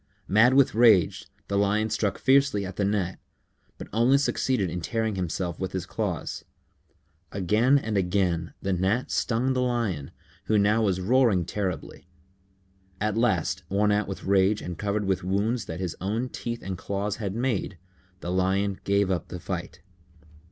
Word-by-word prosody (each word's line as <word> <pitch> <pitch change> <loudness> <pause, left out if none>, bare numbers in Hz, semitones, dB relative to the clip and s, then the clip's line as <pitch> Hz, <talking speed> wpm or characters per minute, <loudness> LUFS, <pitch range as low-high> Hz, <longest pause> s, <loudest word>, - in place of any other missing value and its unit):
Mad 115 +6 +5
with 140 -1 +5
rage, 110 -6 +4 0.2
the 100 0 0
Lion 105 +2 +1
struck 105 -2 0
fiercely 135 -7 +3
at 95 0 -7
the 100 - -1
Gnat, 100 -3 -1 0.6
but - - -8
only 120 +5 +4
succeeded 130 -6 0
in 90 +1 -4
tearing 110 +4 -1
himself 90 -2 -3
with 95 0 -4
his 95 -2 -3
claws. 95 -5 -3 0.9
Again 110 +8 +3
and 110 -6 -2
again 90 -3 0
the 95 - 0
Gnat 95 +7 0
stung 125 +3 +1
the 130 - 0
Lion, 115 - -1 0.4
who 110 - +2
now 105 +2 +3
was 95 -4 +1
roaring 105 -3 +3
terribly. 95 -2 -4 0.9
At 105 0 0
last, 110 -8 +1
worn 105 +2 +2
out 105 +1 +1
with 95 - -6
rage 100 +2 +3
and 90 - -6
covered 105 +3 -2
with 95 -2 0
wounds 100 +5 0
that 80 +2 -6
his 90 -3 -3
own 110 +6 -2
teeth 120 -1 -5
and 95 -1 -5
claws 100 +2 -3
had 100 -3 -4
made, 115 -6 -1 0.4
the 85 - -4
Lion 95 +2 0
gave 100 -1 +2
up 90 - -2
the 90 - -7
fight. 90 -1 -6
100 Hz, 165 wpm, -26 LUFS, 95-110 Hz, 0.9 s, Mad